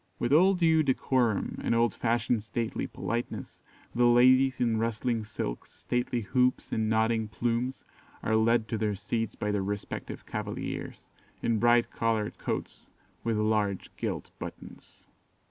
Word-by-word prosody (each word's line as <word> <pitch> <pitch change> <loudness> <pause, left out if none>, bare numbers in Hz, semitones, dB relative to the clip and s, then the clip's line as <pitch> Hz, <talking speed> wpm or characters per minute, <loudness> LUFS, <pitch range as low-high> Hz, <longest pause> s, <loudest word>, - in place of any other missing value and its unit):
With 120 +3 0
all 185 +5 +6
due 165 -3 +4
decorum 130 -6 +1
and 115 - +1
old 115 -2 +3
fashioned 120 -1 0
stately 115 +1 -3
politeness, 120 +1 -4 0.3
the 120 0 +3
ladies 130 +2 +5
in 115 -2 +2
rustling 115 0 -1
silks, 80 - -5
stately 125 0 -2
hoops, 125 +4 +1
and 110 -1 0
nodding 110 0 +2
plumes, 120 +4 -2 0.4
are 110 - +1
led 115 0 +3
to 110 - -2
their 105 -1 0
seats 115 +3 -3
by 105 - -2
their 105 -1 0
respective 100 +1 -5
cavaliers, - - -5 0.3
in 115 -2 +1
bright 120 +1 +4
coloured 110 -2 -1
coats - - -4 0.3
with 115 -2 0
large 105 -2 0
gilt - - -4
buttons. - - -10
115 Hz, 140 wpm, -29 LUFS, 110-125 Hz, 0.4 s, all